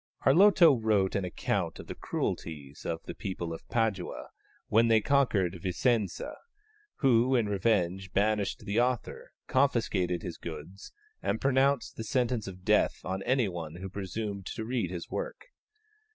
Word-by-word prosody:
Arlotto 170 Hz, +1 st, +7 dB
wrote 110 Hz, -5 st, +1 dB
an 100 Hz, -2 st, 0 dB
account 90 Hz, -, -2 dB
of -, -, -9 dB
the -, -, -6 dB
cruelties 75 Hz, -3 st, -4 dB
of 80 Hz, -1 st, -3 dB
the -, -, -7 dB
people 90 Hz, -5 st, -4 dB
of 80 Hz, -, -10 dB
Padua 110 Hz, -6 st, -1 dB, 0.4 s
when 115 Hz, +2 st, +4 dB
they 115 Hz, -1 st, +5 dB
conquered 105 Hz, -9 st, +2 dB
Vicenza, 100 Hz, +2 st, 0 dB, 0.6 s
who, 130 Hz, -1 st, +4 dB
in 115 Hz, -4 st, +2 dB
revenge, 95 Hz, -2 st, 0 dB
banished 105 Hz, 0 st, 0 dB
the 100 Hz, +3 st, +1 dB
author, 125 Hz, -1 st, -1 dB
confiscated 110 Hz, -10 st, +1 dB
his 85 Hz, -, -5 dB
goods, 85 Hz, +4 st, -8 dB, 0.3 s
and -, -, -1 dB
pronounced 135 Hz, -3 st, +1 dB
sentence 120 Hz, -1 st, 0 dB
of 95 Hz, -1 st, -9 dB
death -, -, +3 dB
on 95 Hz, +1 st, -2 dB
any 125 Hz, 0 st, +2 dB
one 85 Hz, -4 st, -6 dB
who 95 Hz, +2 st, -6 dB
presumed 100 Hz, 0 st, -5 dB
to 110 Hz, -, -4 dB
read 115 Hz, -6 st, -1 dB
his 85 Hz, -2 st, -6 dB
work. -, -, -5 dB
105 Hz, 145 wpm, -29 LUFS, 90-120 Hz, 0.6 s, Arlotto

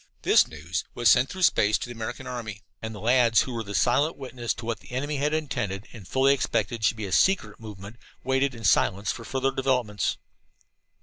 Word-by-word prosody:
This -, -, +5 dB
news 80 Hz, +3 st, -4 dB
was 120 Hz, -4 st, +5 dB
sent 125 Hz, +5 st, +4 dB
through 185 Hz, 0 st, -4 dB
space 105 Hz, -9 st, +4 dB
to -, -, -5 dB
the -, -, -8 dB
American 120 Hz, +3 st, -6 dB
army; 115 Hz, -4 st, -6 dB, 0.2 s
and 110 Hz, 0 st, -5 dB
the -, -, -8 dB
lads 120 Hz, +1 st, +4 dB
who 130 Hz, -, -4 dB
were 115 Hz, -, -3 dB
the 100 Hz, -2 st, -6 dB
silent 145 Hz, +6 st, +2 dB
witnesses 125 Hz, -3 st, -4 dB
to 115 Hz, -, -8 dB
what 115 Hz, -2 st, -3 dB
the -, -, -17 dB
enemy 145 Hz, +3 st, -2 dB
had 145 Hz, +2 st, 0 dB
intended 120 Hz, -10 st, -3 dB
and 105 Hz, -7 st, -11 dB
fully 135 Hz, +1 st, +3 dB
expected 120 Hz, -4 st, -1 dB
should 110 Hz, +3 st, +2 dB
be 110 Hz, -, -4 dB
a 95 Hz, -, -6 dB
secret 110 Hz, -, +2 dB
movement, 105 Hz, 0 st, -10 dB, 0.3 s
waited 130 Hz, 0 st, +1 dB
in 115 Hz, -, -10 dB
silence 100 Hz, +1 st, +2 dB
for 115 Hz, -, -7 dB
further 135 Hz, +2 st, -1 dB
developments. 125 Hz, -6 st, 0 dB
120 Hz, 205 wpm, -26 LUFS, 105-130 Hz, 0.3 s, This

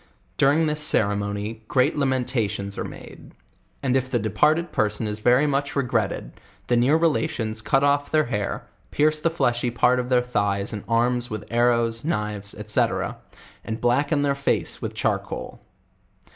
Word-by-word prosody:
Durirg 145 Hz, +4 st, +3 dB
this 150 Hz, 0 st, -1 dB
ceremony, 105 Hz, -3 st, 0 dB
great 130 Hz, -2 st, +2 dB
la 140 Hz, -2 st, +1 dB
mentioES 120 Hz, -6 st, -1 dB
are -, -, -3 dB
made; -, -, -11 dB, 0.5 s
and 130 Hz, -1 st, +1 dB
if 130 Hz, -1 st, 0 dB
the 125 Hz, -, +1 dB
departed 150 Hz, -, +1 dB
person 105 Hz, +1 st, 0 dB
is 105 Hz, 0 st, -3 dB
very 125 Hz, +6 st, +4 dB
much 140 Hz, -1 st, -1 dB
regretted, 120 Hz, -7 st, -1 dB, 0.3 s
the 120 Hz, -, +1 dB
near 125 Hz, +6 st, +4 dB
relations 150 Hz, -9 st, 0 dB
cut 135 Hz, +5 st, +2 dB
oft" 145 Hz, 0 st, +1 dB
their 155 Hz, -1 st, +4 dB
hair, 105 Hz, -4 st, -3 dB, 0.2 s
pierce 155 Hz, +1 st, +2 dB
the 165 Hz, -, +1 dB
fleshy 120 Hz, -7 st, 0 dB
part 125 Hz, +1 st, +2 dB
of 125 Hz, 0 st, -3 dB
their 125 Hz, -1 st, +3 dB
thighs 100 Hz, -4 st, -1 dB
and 105 Hz, -, -5 dB
arms 120 Hz, +1 st, +1 dB
with 110 Hz, -1 st, -5 dB
arrows, 115 Hz, -1 st, +2 dB
knives, 105 Hz, -8 st, -3 dB
&c. 105 Hz, -, +3 dB, 0.8 s
and 110 Hz, +1 st, -4 dB
blacken 140 Hz, +5 st, +1 dB
their 140 Hz, -1 st, +2 dB
face 140 Hz, 0 st, -1 dB
with -, -, -5 dB
charcoal. -, -, -3 dB
120 Hz, 160 wpm, -24 LUFS, 110-140 Hz, 0.8 s, very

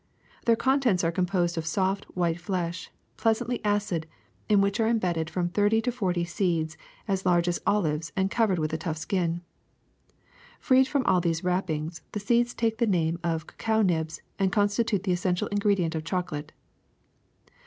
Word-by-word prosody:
Their 230 Hz, -, +5 dB
contents 260 Hz, -7 st, +2 dB
are 165 Hz, -, +2 dB
composed 175 Hz, -1 st, 0 dB
of 160 Hz, -, -4 dB
soft 190 Hz, +4 st, 0 dB
white 170 Hz, -1 st, 0 dB
flesh, 175 Hz, -2 st, -3 dB, 0.3 s
pleasantly 235 Hz, +2 st, 0 dB
acid, 205 Hz, -6 st, 0 dB, 0.4 s
in 210 Hz, -2 st, +5 dB
which 200 Hz, +2 st, +1 dB
are 220 Hz, -, +3 dB
embedded 175 Hz, -8 st, 0 dB
from 175 Hz, +1 st, -1 dB
thirty 205 Hz, +4 st, +3 dB
to 245 Hz, +2 st, 0 dB
forty 185 Hz, -8 st, -1 dB
seeds 165 Hz, -3 st, -1 dB, 0.3 s
as 195 Hz, -1 st, 0 dB
large 175 Hz, -1 st, +3 dB
as 175 Hz, -, 0 dB
olives 160 Hz, -6 st, +1 dB
and 190 Hz, 0 st, +1 dB
covered 220 Hz, -6 st, +2 dB
with 155 Hz, -1 st, -1 dB
a 160 Hz, -, -1 dB
tough 160 Hz, -1 st, -3 dB
skin. 170 Hz, 0 st, -1 dB, 1.2 s
Freed 260 Hz, 0 st, +4 dB
from 275 Hz, -2 st, 0 dB
all 185 Hz, -2 st, +3 dB
these 165 Hz, -1 st, -1 dB
wrappings, 170 Hz, -3 st, -1 dB
the 210 Hz, -, -2 dB
seeds 235 Hz, +3 st, +1 dB
take 225 Hz, -1 st, 0 dB
the 235 Hz, -, +3 dB
name 170 Hz, -3 st, +1 dB
of 165 Hz, -2 st, -1 dB
cacao 220 Hz, +4 st, 0 dB
nibs 160 Hz, -4 st, -1 dB, 0.2 s
and 190 Hz, -1 st, +2 dB
constitute 205 Hz, 0 st, +1 dB
the 190 Hz, -, 0 dB
essential 180 Hz, 0 st, 0 dB
ingredient 200 Hz, -5 st, +1 dB
of 160 Hz, -1 st, -3 dB
chocolate. 165 Hz, -4 st, -3 dB
185 Hz, 165 wpm, -27 LUFS, 170-210 Hz, 1.2 s, Their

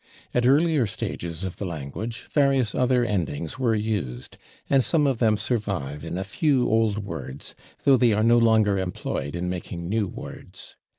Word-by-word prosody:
At 125 Hz, 0 st, +2 dB
earlier 145 Hz, -2 st, +3 dB
stages 95 Hz, -5 st, -5 dB
of 95 Hz, -2 st, -5 dB
the 100 Hz, -, -4 dB
language 85 Hz, -, -5 dB
various 135 Hz, -6 st, +2 dB
other 125 Hz, -1 st, +2 dB
endings 85 Hz, -, -2 dB
were 120 Hz, -4 st, +2 dB
used, 105 Hz, -, -3 dB, 0.3 s
and 135 Hz, -2 st, +4 dB
some 155 Hz, +1 st, +2 dB
of 135 Hz, -4 st, +1 dB
them 110 Hz, -3 st, +3 dB
survive 100 Hz, -, -2 dB
in 85 Hz, +2 st, -4 dB
a 95 Hz, -, -2 dB
few 135 Hz, -, +1 dB
old 110 Hz, -2 st, +1 dB
words, 75 Hz, -7 st, -7 dB, 0.3 s
though 135 Hz, -2 st, +6 dB
they 120 Hz, -2 st, +4 dB
are 105 Hz, +1 st, +2 dB
no 120 Hz, +1 st, +5 dB
longer 110 Hz, -4 st, +4 dB
employed 85 Hz, -5 st, -3 dB
in 90 Hz, +1 st, -2 dB
making 85 Hz, -1 st, -5 dB
new 105 Hz, +1 st, 0 dB
words. -, -, -10 dB
110 Hz, 170 wpm, -25 LUFS, 90-125 Hz, 0.3 s, though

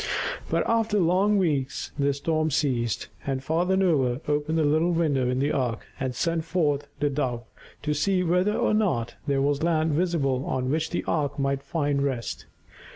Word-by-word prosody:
But -, -, +1 dB
after 225 Hz, -2 st, +2 dB
long 190 Hz, +4 st, +3 dB
weeks 145 Hz, -8 st, -1 dB
the 140 Hz, 0 st, +3 dB
storm 155 Hz, +3 st, 0 dB
ceased, 130 Hz, -7 st, 0 dB
and 135 Hz, -1 st, -2 dB
Father 175 Hz, +6 st, +1 dB
Noah 140 Hz, -10 st, +2 dB
opened 150 Hz, +2 st, 0 dB
the 160 Hz, -, +3 dB
little 155 Hz, +3 st, +2 dB
window 145 Hz, -7 st, +1 dB
in 125 Hz, -, 0 dB
the 140 Hz, +3 st, +1 dB
ark 125 Hz, -6 st, -1 dB
and 130 Hz, -2 st, -2 dB
sent 165 Hz, +5 st, 0 dB
forth 155 Hz, -4 st, 0 dB
the 145 Hz, -, +2 dB
Dove 125 Hz, -4 st, -2 dB, 0.4 s
to 150 Hz, 0 st, 0 dB
see 180 Hz, +5 st, +1 dB
whether 180 Hz, +4 st, +2 dB
or 240 Hz, -2 st, +2 dB
not 145 Hz, -, +1 dB
there 135 Hz, -1 st, +2 dB
was 145 Hz, 0 st, +1 dB
land 160 Hz, -1 st, +2 dB
visible 145 Hz, -5 st, +1 dB
on 130 Hz, 0 st, -1 dB
which 160 Hz, +1 st, 0 dB
the 175 Hz, -, -2 dB
ark 150 Hz, -3 st, -1 dB
might 135 Hz, -1 st, 0 dB
find 145 Hz, -1 st, -1 dB
rest. 130 Hz, -4 st, -3 dB
150 Hz, 175 wpm, -26 LUFS, 135-170 Hz, 0.4 s, long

